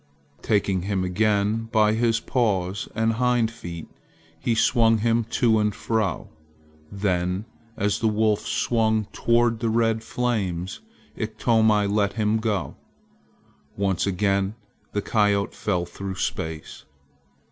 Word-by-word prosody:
Taking 100 -3 +1
him 95 0 -1
again 105 +3 +1
by 110 -2 +4
his 115 0 +2
paws 100 -7 -1
and 115 0 +1
hind 120 -1 +1
feet, 85 -8 -8 0.5
he 115 +7 0
swung 115 0 +4
him 115 +1 +1
to 115 -1 +2
and 105 -1 0
fro. 110 -6 -1 0.6
Then 95 -1 -1 0.3
as 105 +2 0
the 115 - +1
wolf 105 -1 +2
swung 110 -2 +1
toward 120 -1 +2
the 115 - 0
red 115 0 +1
flames, 100 - -2 0.4
Iktomi 110 -1 +2
let 100 0 +1
him 110 -1 +1
go. 105 -6 -2 1.0
Once 100 -2 0
again 100 +1 0 0.4
the 105 - -2
coyote 105 -2 +1
fell 90 -4 -1
through 95 +2 -6
space. 80 -4 -4
105 Hz, 120 wpm, -24 LUFS, 100-115 Hz, 1.0 s, by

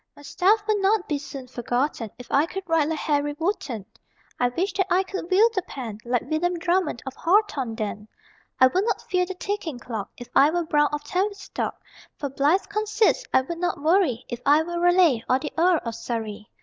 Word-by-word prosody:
My 290 - -15
stuff 410 +8 +2
would 425 -1 +2
not 400 0 +2
be 295 -2 -1
soon 275 -2 -8
forgotten 245 -1 -2
If 250 - -10
I 290 +4 +3
could 385 +2 -5
write 325 -3 +2
like 320 - -1
Harry 290 -1 0
Wotton. 300 - -2 0.5
I 245 - +3
wish 360 +11 -2
that 385 -2 0
I 370 +1 +3
could 380 -2 -6
wield 435 +5 +5
the 375 - 0
pen 240 - -7
Like 245 0 0
William 350 +3 -1
Drummond 350 -5 0
of 265 - -5
Hawthornden. 250 - 0 0.5
I 260 - +8
would 360 +10 +2
not - - -2
fear 360 -1 +2
the 380 - -5
ticking 365 -7 -4
clock 225 -4 -5
If 245 - -9
I 285 - +7
were 345 +1 -1
Browne 295 -2 +3
of 295 0 -3
Tavistock. 395 +6 -2 0.4
For 285 - -3
blithe 290 +8 +2
conceits 430 +3 +1
I - - +5
would 335 +6 -6
not 350 -4 -1
worry 315 - +2
If 240 - -5
I 295 +3 +5
were 345 +1 -4
Raleigh, 350 -9 +4
or 255 - +4
the 295 +2 -6
Earl 345 0 +4
of 230 - -3
Surrey. 220 -3 -5
320 Hz, 200 wpm, -24 LUFS, 255-370 Hz, 0.5 s, I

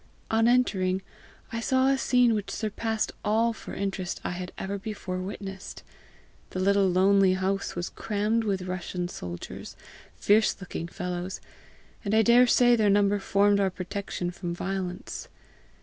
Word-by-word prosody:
On 225 +1 +4
entering 195 -7 +2 0.5
I 230 - -2
saw 260 +3 +2
a 270 - +4
scene 250 -3 +3
which 210 -2 -2
surpassed 220 +1 -2
all 225 +2 +2
for - - -9
interest 195 -2 -3
I - - -2
had 180 0 -5
ever 200 +1 -3
before 190 -3 -5
witnessed. 195 0 -7 0.7
The 185 - -4
little 200 +1 +3
lonely 190 +1 +4
house 190 +1 -1
was 175 0 -3
crammed 215 +2 -1
with 195 -4 -1
Russian 180 -1 -4
soldiers, 85 - -7 0.4
fierce 215 +2 +3
looking 175 -3 -5
fellows, 180 +1 -4 0.6
and 205 0 0
I 220 - +5
daresay 245 +1 +6
their 215 -3 +3
number 205 0 +3
formed 200 +1 +3
our 195 -1 +3
protection 185 -1 -4
from 175 -1 -5
violence. 185 -1 -4
200 Hz, 145 wpm, -27 LUFS, 185-220 Hz, 0.7 s, daresay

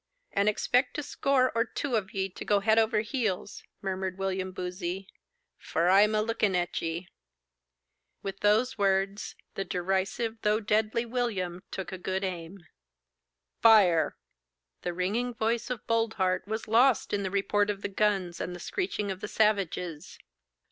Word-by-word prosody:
'And 200 +1 +3
expect 250 +7 +1
a 300 - -2
score 275 -2 +2
or 230 0 +3
two 250 +2 -3
on 200 -4 0
ye 190 -1 -1
to 180 - -8
go 205 -1 +3
head 220 +2 +4
over 220 -1 +2
heels,' 220 -5 -2 0.2
murmured 190 -1 -2
William 190 -1 -2
Boozey; 180 +1 -4 0.5
'for 175 - 0
I'm 210 +3 +5
a 215 - +2
looking 215 -4 +1
at 175 0 -1
ye.' 165 +2 -3 1.2
With 195 0 -5
those 220 +4 +2
words, 195 0 0 0.2
the 195 - -2
derisive 190 +5 -1
though 210 +1 +2
deadly 220 +2 +1
William 210 -8 -2
took 190 - -5
a 185 - -6
good 190 +2 -2
aim. 175 0 -5 1.0
'Fire!' 200 -8 +5 0.6
The 175 - -2
ringing 220 +8 -1
voice 225 +2 0
of 250 -4 -4
Boldheart 220 -5 0
was 220 +1 -3
lost 235 +2 +4
in 205 - +1
the 190 - -2
report 200 +1 +1
of 200 -1 -3
the - - 0
guns 195 -4 0
and 180 - -4
the - - -9
screeching 210 - -2
of 185 - -5
the 210 - -5
savages. 190 -7 0
200 Hz, 155 wpm, -29 LUFS, 185-220 Hz, 1.2 s, I'm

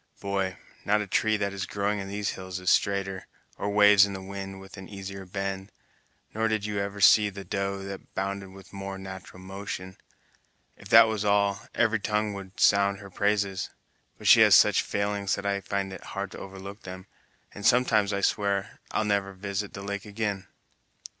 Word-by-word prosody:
Boy, 95 -1 -2 0.3
not 105 +1 +2
a - - -3
tree 110 +2 +1
that 100 -1 -2
is 100 -1 -4
growing 105 +1 -1
in 95 - -5
these 100 +1 -2
hills 95 -1 -6
is 90 - +2
straighter, 95 -1 0 0.3
or 100 - -1
waves 105 -1 +7
in 100 -1 0
the 95 - -5
wind 95 0 -7
with 95 0 -12
an 95 -1 -10
easier 95 -1 -7
bend, 95 +1 -4 0.6
nor 110 +1 +1
did 110 -2 -1
you 105 -1 -2
ever 100 0 -3
see 105 +1 +6
the 100 0 -8
doe 100 +1 -3
that 100 0 -9
bounded 95 0 -3
with 95 0 -14
a - - -9
more 95 0 -5
nat'ral 95 -1 -9
motion. 95 -1 -6 0.8
If 100 - -14
that 115 +1 +9
was 110 -2 -2
all, 100 -1 +1
every 115 -1 +2
tongue 105 0 -1
would 95 -1 -9
sound 100 0 +4
her 100 -1 -11
praises; 100 -1 0 0.5
but - - -12
she - - +8
has - - +8
such - - +6
failings 100 -1 -1
that 100 - -7
I 100 0 0
find 100 0 -3
it - - -9
hard 100 -1 -5
to - - -9
overlook 95 +2 -9
them, 95 0 -9 0.5
and 105 - -9
sometimes 110 -4 +4
I 100 0 -1
swear 100 -1 0
I'll 110 - 0
never 100 -1 0
visit 100 +1 -4
the 100 - -7
lake 100 0 -4
again." 100 -2 -3
100 Hz, 190 wpm, -27 LUFS, 95-100 Hz, 0.8 s, that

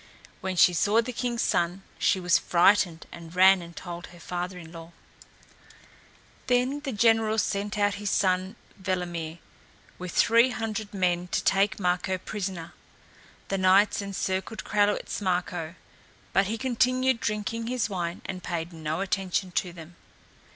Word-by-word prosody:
When 185 0 -3
she 180 0 +6
saw 205 +6 +3
the 240 +2 -1
king's 240 -1 -1
son 175 +3 0 0.2
she 190 - +2
was 180 -1 +3
frightened 175 -1 +3
and 170 0 -11
ran 190 0 +6
and 170 0 -11
told 175 -1 -7
her 175 - -15
father 180 +2 -4
in 165 -2 -11
law. 165 0 -11 1.5
Then 250 +3 +2
the 285 -2 -4
general 225 0 +3
sent 205 0 -1
out 205 -1 +2
his 205 - -1
son 185 +1 +1 0.3
Velimir 175 -3 -3 0.6
with 180 -1 -5
three 230 +7 +4
hundred 220 -3 -4
men 180 -2 0
to - - -1
take 195 +1 +2
Marko 180 0 0
prisoner. 185 -3 -5 0.8
The 195 - -1
knights 190 +3 +4
encircled 195 +1 -3
Kralewitz 205 0 0
Marko, 180 -3 -2 0.6
but 195 +1 +3
he 225 +2 -2
continued 255 +1 +1
drinking 215 +2 -2
his 250 -2 0
wine 175 -4 -4
and 185 -1 -5
paid 170 -1 -4
no 160 +1 -3
attention 190 -1 -1
to 180 0 -1
them. 170 0 -12
190 Hz, 145 wpm, -27 LUFS, 175-210 Hz, 1.5 s, she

